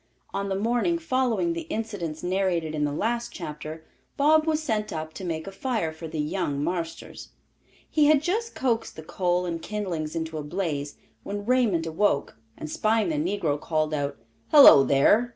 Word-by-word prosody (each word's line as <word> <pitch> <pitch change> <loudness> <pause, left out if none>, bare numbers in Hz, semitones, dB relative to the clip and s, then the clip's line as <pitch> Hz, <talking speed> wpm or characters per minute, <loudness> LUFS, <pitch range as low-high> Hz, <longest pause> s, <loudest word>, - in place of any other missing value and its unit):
On 200 0 -2
the 190 - -1
morning 240 - +1
following 255 - 0
the 165 -1 -6
incidents 200 -8 -4
narrated 180 -4 0
in 150 -1 0
the 145 - -1
last 235 +9 -1
chapter, 155 -1 -7 0.3
Bob 310 +2 +4
was 310 -1 +2
sent 215 -7 -1
up 155 0 -5
to 190 - -8
make 160 -3 -3
a 195 - -7
fire 215 -6 -2
for 160 +1 -8
"the 160 0 -6
young 150 -2 -1
marsters." 170 0 -4 0.6
He 300 -2 +3
had 305 -1 +6
just 450 +7 -1
coaxed 235 -3 -1
the 160 - -9
coal 180 +2 0
and 170 -2 -3
kindlings 170 -7 -4
into 160 -1 -3
a - - -5
blaze, 150 -3 -3 0.3
when 205 0 -5
Raymond 230 -9 +2
awoke, 160 -2 0 0.2
and - - -6
spying 215 +4 +1
the 155 - -1 0.2
negro, 150 -5 -1
called 155 -1 -1
out, 145 -1 -2 0.3
"Hello, 280 - +9
there! 205 - +4
180 Hz, 175 wpm, -26 LUFS, 155-225 Hz, 0.6 s, Hello